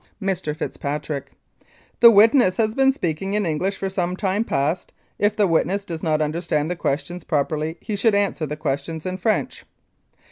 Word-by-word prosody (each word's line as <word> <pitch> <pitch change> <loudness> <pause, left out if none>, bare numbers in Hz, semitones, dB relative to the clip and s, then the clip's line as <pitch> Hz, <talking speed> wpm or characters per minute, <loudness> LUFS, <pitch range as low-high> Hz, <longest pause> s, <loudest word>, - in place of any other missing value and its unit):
Mr. 185 -7 -2
FITZPATRICK: 145 -2 -4 0.7
This 235 -1 +9
witness 215 -2 +5
has 220 -1 +1
been 270 +2 +4
speaking 195 - -2
in 210 -1 +1
English 180 +5 -1
for 195 - -3
some 180 -2 -2
time 195 +2 0
past. 155 -1 -1 0.3
If 205 +1 +2
the 210 - +3
witness 190 +3 +1
does 165 -4 -6
not 155 -1 +1
under 155 +3 -2
stand 155 -1 -1
the - - -1
questions 175 +3 -3
properly 155 +2 -1
he 215 - -4
should 205 +1 +2
answer 200 -6 0
the 150 +1 -5
questions 155 +1 -3
in 185 0 -3
French. 215 +4 -1
180 Hz, 175 wpm, -22 LUFS, 155-200 Hz, 0.7 s, This